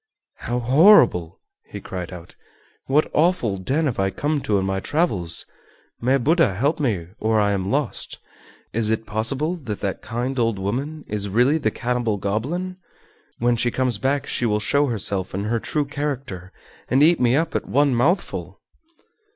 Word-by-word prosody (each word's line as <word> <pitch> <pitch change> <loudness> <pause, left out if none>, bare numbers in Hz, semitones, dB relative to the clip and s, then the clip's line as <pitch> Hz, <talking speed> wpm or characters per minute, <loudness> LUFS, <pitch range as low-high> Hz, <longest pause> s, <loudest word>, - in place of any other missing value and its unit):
"How 120 - -3
horrible!" 125 - +5 0.3
he - - -8
cried 90 -1 -6
out. 85 -2 -11 0.5
"What 145 +3 +2
awful 155 - +2
den 135 - -1
have 130 -8 -1
I 95 0 +2
come 145 +7 -1
to 105 -5 +1
in 95 - 0
my 95 0 -1
travels? 95 - -1 0.6
May 130 +3 +3
Buddha 150 - +2
help 140 - 0
me 100 - -1
or 110 0 +2
I 100 -1 +2
am 95 -1 -1
lost. 140 -1 -2 0.6
Is 110 -1 +1
it 110 0 -1
possible 120 +11 0
that 115 - -6
that 100 -2 -3
kind 125 +3 -3
old 115 -3 +1
woman 135 +11 -3
is 100 -1 -3
really 125 +10 +3
the - - +1
cannibal 120 -3 -1
goblin? 145 - -3 0.6
When 120 0 +2
she 120 +1 +1
comes 125 -3 -1
back 135 +3 0
she 120 - -1
will 105 -1 +1
show 140 +7 +2
herself 100 -5 -1
in 100 - -2
her 115 +2 0
true 150 +5 -1
character 135 -11 -5 0.4
and 135 +3 +4
eat 170 +2 +5
me 125 0 +3
up 165 +2 0
at - - -2
one 140 0 +3
mouthful!" 150 +11 0
120 Hz, 170 wpm, -22 LUFS, 100-145 Hz, 0.6 s, horrible